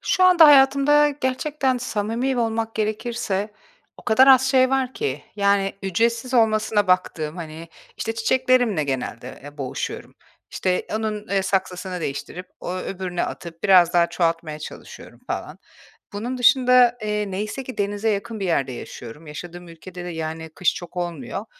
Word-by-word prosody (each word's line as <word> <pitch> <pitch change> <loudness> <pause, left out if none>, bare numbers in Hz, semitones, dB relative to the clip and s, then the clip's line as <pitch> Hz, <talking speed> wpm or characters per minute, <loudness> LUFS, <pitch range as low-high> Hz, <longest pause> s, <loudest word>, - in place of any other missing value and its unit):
Şu 370 - +2
anda 355 -3 +8
hayatımda 280 +1 +6
gerçekten 265 -1 -1
samimi 240 +3 -2
olmak 225 -1 -1
gerekirse 215 -1 -2 0.4
o - - -16
kadar 245 +4 +5
az 265 0 +6
şey 260 -1 +4
var 265 -1 0
ki. 135 +1 -3
Yani, 200 -1 +2
ücretsiz 230 +6 0
olmasına 215 -2 +2
baktığım, 175 -4 0
hani, 165 -1 -8 0.3
işte, 225 - -3
çiçeklerimle 245 - +2
genelde, 130 -2 -5
eee, 145 +1 -11
boğuşuyorum. 130 -2 -5 0.4
İşte, 185 -1 -1
onun, 215 -1 -3
eee, 195 -1 +1
saksısını 185 -1 -2
değiştirip, 165 +6 -5
o 180 - -4
öbürüne 185 -1 -3
atıp 170 -1 -8
biraz 185 -3 +5
daha 175 -1 +4
çoğaltmaya 165 -3 -1
çalışıyorum 155 - -11
falan. - - -5 0.6
Bunun 240 +5 -4
dışında, 250 -1 +5
eee, 210 -1 -2
neyse 210 +7 -4
ki 255 - -9
denize 205 +2 -1
yakın 215 +2 -3
bir 195 - -2
yerde 140 -6 0
yaşıyorum. 125 +4 -9
Yaşadığım 175 +3 -9
ülkede 175 +2 -10
de, - - -5
yani, 160 -1 -5
kış 185 - +2
çok 175 +1 -9
olmuyor. 175 - -4
205 Hz, 145 wpm, -22 LUFS, 175-245 Hz, 0.6 s, anda